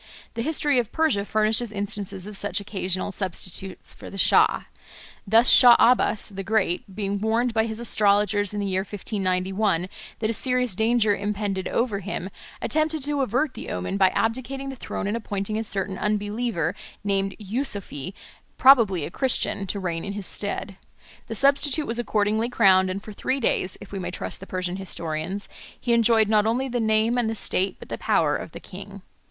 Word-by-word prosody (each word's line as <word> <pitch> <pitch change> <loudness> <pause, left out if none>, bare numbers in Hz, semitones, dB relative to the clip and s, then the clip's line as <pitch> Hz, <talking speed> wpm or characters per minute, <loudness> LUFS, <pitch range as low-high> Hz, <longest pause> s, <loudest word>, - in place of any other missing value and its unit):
The 230 - -3
history 290 -1 +2
of 235 -2 -3
Persia 315 -11 +1
furnishes 215 +2 +1
instances 200 -2 -4
of 210 0 -7
such 205 0 -1
occasional 190 -1 -2
substitutes 190 0 -4
for - - -11
the 195 - -9
Shah. - - +4 0.6
Thus 225 +4 +5
Shah 245 -2 +9
Abbas 230 -4 +3
the 195 -1 -6
Great, 195 -2 -1
being 200 -1 -2
warned 225 +3 +1
by 220 0 +1
his 220 0 -5
astrologers 205 -3 +3
in 210 - -4
the 200 - -1
year 190 -1 0
1591 190 -2 -1 0.3
that 220 - -1
a - - -1
serious 250 0 +1
danger 220 0 +2
impended 200 -2 -2
over 230 -4 -1
him, 195 -1 -5 0.3
attempted 310 -1 0
to 290 0 0
avert 260 +3 0
the - - -8
omen 90 - -3
by 190 -1 +5
abdicating 260 +4 -1
the 270 - -6
throne 235 - -5
and 205 +3 -1
appointing 215 -1 -3
a - - -2
certain 195 -2 -3
unbeliever 210 -4 -1 0.3
named 195 -1 -1
Yusoofee, 200 - -3 0.4
probably 225 - +5
a - - -7
Christian, 240 -4 0
to 200 - -3
reign 170 -3 -3
in 200 - -5
his 205 -1 -5
stead. 200 -1 -3 0.5
The 225 - -5
substitute 280 +4 +3
was 235 -1 -3
accordingly 220 0 0
crowned, 190 -5 +4
and 195 +2 -4
for 215 - -9
three 260 +6 -2
days, 190 -6 0
if - - -12
we 195 - -4
may 175 -1 -4
trust 180 - -4
the 195 - -10
Persian 185 0 -3
historians, 180 +1 -4 0.3
he 240 - 0
enjoyed 230 -2 +4
not 215 0 +3
only 250 +4 0
the 245 -1 -2
name 220 +2 +2
and 230 -2 0
the 225 - -2
state 195 -2 +1
but - - -13
the - - -5
power - - +2
of - - -6
the - - -8
king. - - -11
210 Hz, 180 wpm, -24 LUFS, 195-235 Hz, 0.6 s, Shah